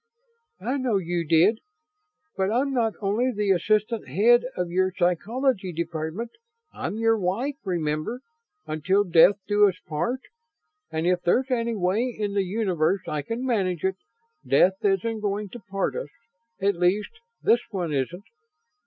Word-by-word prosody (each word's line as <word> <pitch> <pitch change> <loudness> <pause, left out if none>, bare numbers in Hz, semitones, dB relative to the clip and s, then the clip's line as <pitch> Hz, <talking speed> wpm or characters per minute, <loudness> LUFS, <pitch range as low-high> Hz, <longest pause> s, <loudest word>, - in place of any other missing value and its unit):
"I 250 +8 -1
know 250 -6 +1
you 175 -2 -1
did. 165 +8 +4 0.8
But 190 +1 0
I'm 270 +4 +1
not 230 -4 +1
only 215 +6 +1
the 210 -3 0
assistant 215 - +1
head 225 - +4
of 180 -1 -2
your 185 +1 +2
Psychology 200 +4 0
Department. 170 +6 -4 0.4
I'm - - -4
your 225 0 +2
wife, 230 +10 -1
remember? 170 +5 -2 0.4
'Until 185 +6 +1
death 180 +1 +6
do 205 0 +5
us 185 - -6
part.' 235 +13 -2 0.7
And 160 +1 -2
if 180 0 +2
there's 255 +10 +1
any 235 -2 0
way 195 +4 +1
in 205 -2 -2
the 200 - +2
universe 185 -3 0
I 150 -1 -2
can 230 - -4
manage 190 -9 0
it, 190 0 0 0.5
death 165 +8 +3
isn't 210 +3 +1
going 205 0 -2
to 240 - -9
part 195 0 -1
us - - -4 0.5
at 200 +1 +2
least, 180 +4 +1 0.3
this 235 - +5
one 175 -6 -3
isn't. 165 +8 -2
195 Hz, 150 wpm, -25 LUFS, 175-225 Hz, 0.8 s, death